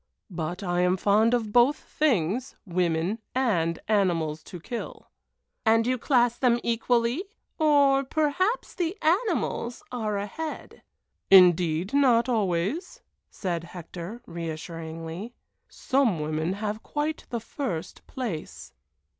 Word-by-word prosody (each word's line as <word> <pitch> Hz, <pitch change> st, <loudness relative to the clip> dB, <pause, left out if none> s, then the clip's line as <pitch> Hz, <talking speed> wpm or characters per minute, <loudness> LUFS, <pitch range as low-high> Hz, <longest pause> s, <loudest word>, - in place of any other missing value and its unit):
But 175 Hz, +2 st, -4 dB
I 175 Hz, -1 st, 0 dB
am 180 Hz, +1 st, +2 dB
fond 215 Hz, +5 st, +3 dB
of 220 Hz, -3 st, -3 dB
both 245 Hz, +4 st, +5 dB
things 250 Hz, -, 0 dB
women 175 Hz, +2 st, 0 dB, 0.2 s
and 175 Hz, -11 st, +1 dB
animals 170 Hz, -7 st, +1 dB
to 180 Hz, -, -9 dB
kill." 235 Hz, +8 st, -7 dB, 0.5 s
"And 225 Hz, 0 st, +4 dB
you 255 Hz, 0 st, 0 dB
class 240 Hz, -2 st, +2 dB
them 240 Hz, -2 st, +3 dB
equally 235 Hz, +5 st, +1 dB, 0.4 s
or 285 Hz, -3 st, +4 dB
perhaps 320 Hz, -, 0 dB
the 355 Hz, +2 st, -2 dB
animals 335 Hz, -, 0 dB
are 215 Hz, -4 st, -2 dB
ahead." 305 Hz, +11 st, -6 dB, 0.5 s
"Indeed 180 Hz, -, +5 dB
not 250 Hz, -4 st, +4 dB
always," 225 Hz, -, -1 dB, 0.3 s
said 175 Hz, -4 st, -3 dB
Hector, 175 Hz, +6 st, -8 dB
reassuringly. 165 Hz, +4 st, -6 dB, 0.3 s
"Some 260 Hz, -, +1 dB
women 155 Hz, +3 st, -1 dB
have 210 Hz, +2 st, -3 dB
quite 305 Hz, +1 st, -3 dB
the 235 Hz, -, -2 dB
first 205 Hz, -, -5 dB
place." 215 Hz, -, -6 dB
220 Hz, 115 wpm, -26 LUFS, 175-260 Hz, 0.5 s, both